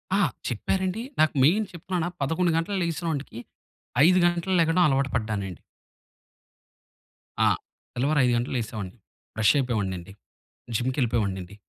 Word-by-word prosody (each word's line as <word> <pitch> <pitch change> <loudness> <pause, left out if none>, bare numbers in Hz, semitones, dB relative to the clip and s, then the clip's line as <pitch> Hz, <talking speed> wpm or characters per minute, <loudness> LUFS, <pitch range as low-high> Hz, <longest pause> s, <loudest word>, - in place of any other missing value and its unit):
ఆ! - - +3 0.3
చెప్పారండి. 185 - -1 0.2
నాకు 155 -1 +4
మెయిన్ 195 +10 +4
చెప్తున్నానా 175 0 -3
11:00 160 +5 +1
గంటలకు 190 +4 -1
లేగిసినోంటికి 160 -7 -3 0.7
5:00 185 +2 +5
గంటలకు 175 +2 +1
లెగడం 165 +2 +3
అలవాటు 135 -1 +1
పడ్డానండి. 105 - -3 1.8
ఆ! - - +5 0.5
తెల్లవారు 140 +4 +1
5:00 125 - +2
గంటలకు 120 +2 -1
లేసేవాడిని. 110 -3 -5 0.4
ఫ్రెష్ 110 -1 +4
అయిపోయేవాడినండి. 100 -9 -2 0.6
జిమ్‌కెళ్ళిపోయేవాడినండి. 110 -7 -1
135 Hz, 110 wpm, -26 LUFS, 110-170 Hz, 1.8 s, 5:00